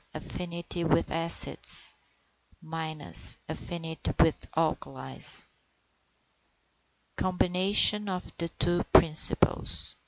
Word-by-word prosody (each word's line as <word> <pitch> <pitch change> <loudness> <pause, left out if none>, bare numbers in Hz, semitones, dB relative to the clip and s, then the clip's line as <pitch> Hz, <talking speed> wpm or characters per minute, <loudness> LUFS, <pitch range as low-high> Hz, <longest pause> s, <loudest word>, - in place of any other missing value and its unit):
Affinity 170 0 -7
with 165 0 -1
acids. 165 +1 +5 1.5
Affinity 165 -2 -7
with 160 - 0
alkalis. 135 - -3 1.7
COMBINATION 190 +3 +1
OF 180 -1 -8
THE 170 0 -4
TWO 175 +1 -3
PRINCIPLES. 155 -2 +2
170 Hz, 65 wpm, -26 LUFS, 165-180 Hz, 1.7 s, acids